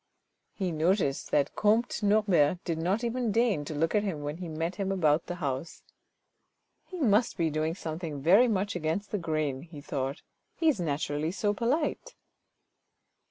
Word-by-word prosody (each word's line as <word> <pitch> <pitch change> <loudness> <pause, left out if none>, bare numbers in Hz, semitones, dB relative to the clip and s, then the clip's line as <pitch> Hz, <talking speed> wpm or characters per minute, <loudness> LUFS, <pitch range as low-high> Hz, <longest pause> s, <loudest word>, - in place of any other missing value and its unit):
He 190 -3 -2
noticed 160 -2 +1
that 145 -1 +1
comte 220 +4 +2
Norbert 200 -6 +3
did 165 -3 -2
not 190 +8 0
even 240 -1 -1
deign 220 -8 +2
to 155 - -5
look 160 +2 0
at 210 - +3
him 180 -8 -3
when 145 +2 -4
he 180 -1 -6
met 165 +3 -3
him 195 -1 -1
about 160 -4 +2
the 175 - -3
house. 145 -1 -4 0.5
" - - -49
He 370 - -7
must 230 -4 +2
be 165 -2 +1
doing 155 +2 -1
something 160 -4 -5
very 190 - +5
much 200 -2 -1
against 175 +5 -2
the 210 - -1
grain," 155 -5 -1
he 165 -2 -11
thought; 140 +1 -4 0.2
" - - -49
he 325 - +3
is 275 - +1
naturally 150 -1 -1
so 205 +2 0
polite." 260 +9 -1
175 Hz, 175 wpm, -29 LUFS, 155-205 Hz, 0.5 s, very